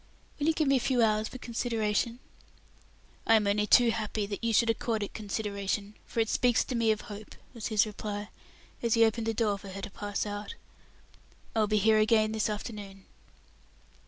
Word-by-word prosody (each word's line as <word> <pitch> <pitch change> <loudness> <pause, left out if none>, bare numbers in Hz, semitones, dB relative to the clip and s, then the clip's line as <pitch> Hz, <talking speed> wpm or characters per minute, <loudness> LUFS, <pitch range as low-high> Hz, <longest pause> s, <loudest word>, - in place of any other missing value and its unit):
"Will 290 - 0
you 325 - +4
give 310 -2 0
me 275 0 +4
a - - +1
few 245 -1 +2
hours 215 0 +2
for - - -8
consideration?" 230 -2 -1 1.1
"I 225 - +7
am 215 -2 +3
only 210 +1 +1
too 240 0 +6
happy 215 -2 -2
that 200 +2 -6
you 230 - +1
should 230 +1 +4
accord 225 -1 -2
it 205 - -6
consideration, 205 -1 -3
for - - -3
it 225 - +1
speaks 245 -2 +3
to - - -5
me 230 -2 +2
of 215 -1 +1
hope," 210 0 -10 0.2
was 230 -3 -4
his 215 -3 +3
reply, 205 -1 -5 0.5
as 235 -1 +2
he 230 0 +6
opened 225 0 -1
the 225 - +1
door 205 -3 +1
for 195 - -10
her 195 +1 -7
to - - -5
pass 205 +1 -3
out. 205 - -5 1.0
"I - - +2
will 215 - +3
be 215 0 +2
here 215 +1 +4
again 215 0 +3
this 220 -1 0
afternoon." 205 -2 -6
215 Hz, 200 wpm, -29 LUFS, 205-230 Hz, 1.1 s, I